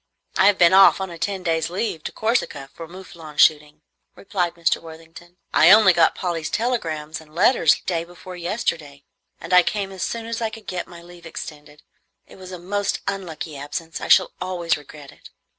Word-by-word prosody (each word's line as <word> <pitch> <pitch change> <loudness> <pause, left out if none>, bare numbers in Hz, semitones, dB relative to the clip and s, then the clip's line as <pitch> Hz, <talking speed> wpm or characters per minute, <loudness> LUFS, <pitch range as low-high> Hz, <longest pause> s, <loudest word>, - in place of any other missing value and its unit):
"I 190 - +5
have 205 -2 +4
been 175 +1 +5
off 195 0 +7
on 190 -2 -4
a 170 - -10
ten 195 0 -3
days' 165 -2 0
leave 180 -3 -3
to - - -4
Corsica 220 - -2
for 165 - -9
moufflon 170 -4 -12
shooting," 150 0 +3 0.3
replied 180 -4 -2
Mr. 170 -1 0
Worthington. 165 +2 -14 0.2
"I 160 - +6
only 205 -2 +8
got 165 -1 +3
Polly's 170 -3 -3
telegrams 160 -11 -2
and 155 0 -19
letters 170 -4 +4
day 170 -2 -2
before 175 +1 -11
yesterday, 165 -6 -3 0.4
and 165 +3 -6
I 180 - +8
came 200 +1 -2
away 190 - -10
as - - -7
soon 230 +4 -3
as 230 0 -4
I 225 - 0
could 220 0 -12
get 180 -2 -4
my 170 -1 -13
leave 175 -1 -13
extended. 150 -2 -10 0.4
It - - -16
was 185 -1 -11
a 180 - -6
most 200 +3 -2
unlucky 175 -5 -5
absence. 145 +4 -6
I - - -4
shall 185 - +5
always 180 -2 -1
regret 145 -1 -12
it." - - -16
175 Hz, 195 wpm, -22 LUFS, 160-190 Hz, 0.4 s, only